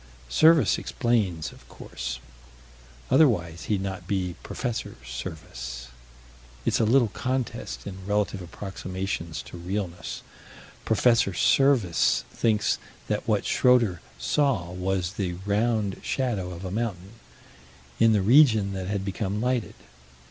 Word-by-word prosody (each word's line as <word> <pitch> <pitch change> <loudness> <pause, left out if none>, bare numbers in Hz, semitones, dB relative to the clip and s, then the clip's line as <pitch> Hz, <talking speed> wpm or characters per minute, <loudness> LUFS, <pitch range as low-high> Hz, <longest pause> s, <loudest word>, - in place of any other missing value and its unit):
Serviss 160 - +5
explains, 105 -10 0
of - - -18
course. - - -6 0.9
Otherwise 85 - +3
he'd 100 -3 0
not 95 0 -5
be 95 -3 -1
Prof. 125 -3 -3 0.3
Serviss. - - -7 0.8
It's - - +2
a 115 - +3
little 120 0 +4
contest 125 - -3
in 95 -1 -8
relative 105 -1 0
approximations 90 -4 -5
to 60 +8 -10
realness. 90 -1 -4 0.6
Prof. 110 - 0 0.3
Serviss 130 - +3
thinks 110 -2 +1 0.3
that - - -1
what - - +1
Schroeter 120 -9 +3 0.2
saw 100 - +1
was 90 -1 -1
the 95 -4 -2
"round" 105 -1 0
shadow 115 -9 -1
of 90 +1 -7
a 90 - -4
mountain 105 -1 -4 0.8
in 115 - +6
the 105 -3 +3
region 110 -4 +5
that 95 -1 -4
had 100 -1 -2
become 100 +1 -2
lighted. 125 -1 -1
100 Hz, 120 wpm, -26 LUFS, 90-115 Hz, 0.9 s, in